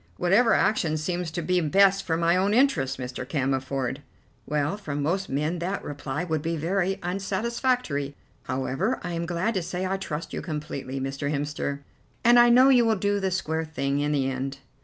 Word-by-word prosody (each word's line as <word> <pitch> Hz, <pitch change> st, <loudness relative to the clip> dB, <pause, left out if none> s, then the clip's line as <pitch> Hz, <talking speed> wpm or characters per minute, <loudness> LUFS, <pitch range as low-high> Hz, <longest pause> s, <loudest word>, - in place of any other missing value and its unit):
"Whatever 205 Hz, +7 st, +4 dB
action 160 Hz, -7 st, +2 dB
seems 175 Hz, +2 st, -2 dB
to 170 Hz, +1 st, -4 dB
be 180 Hz, +1 st, +2 dB
best 195 Hz, +5 st, +4 dB
for 165 Hz, -3 st, -1 dB
my 170 Hz, +1 st, +3 dB
own 195 Hz, +3 st, +2 dB
interests, 140 Hz, -, +2 dB
Mr. 125 Hz, 0 st, -5 dB
Cammerford." 135 Hz, -1 st, -1 dB, 0.5 s
"Well, 150 Hz, +3 st, 0 dB
from 150 Hz, -8 st, -4 dB
most 190 Hz, +6 st, -1 dB
men 150 Hz, +5 st, -1 dB
that 185 Hz, +4 st, -3 dB
reply 145 Hz, +2 st, -4 dB
would 160 Hz, -4 st, -1 dB
be 165 Hz, +1 st, -2 dB
very 190 Hz, +4 st, 0 dB
unsatisfactory. 195 Hz, -, -1 dB, 0.3 s
However, 135 Hz, -, -1 dB
I 175 Hz, -, -4 dB
am 170 Hz, 0 st, -2 dB
glad 175 Hz, +6 st, 0 dB
to 190 Hz, -, 0 dB
say 180 Hz, +2 st, -3 dB
I 190 Hz, +1 st, -1 dB
trust 165 Hz, -4 st, -5 dB
you -, -, -3 dB
completely, 150 Hz, -4 st, -5 dB
Mr. 135 Hz, +2 st, -3 dB
Hemster, 145 Hz, -1 st, -2 dB, 0.4 s
and 240 Hz, +1 st, +7 dB
I 240 Hz, 0 st, +7 dB
know 255 Hz, +3 st, +7 dB
you 250 Hz, -3 st, +6 dB
will 225 Hz, -1 st, +3 dB
do 205 Hz, +1 st, 0 dB
the 190 Hz, -1 st, 0 dB
square 160 Hz, -3 st, -1 dB
thing 140 Hz, -2 st, -2 dB
in 145 Hz, +1 st, 0 dB
the 140 Hz, -3 st, +1 dB
end." 135 Hz, +1 st, -3 dB
165 Hz, 185 wpm, -26 LUFS, 145-195 Hz, 0.5 s, and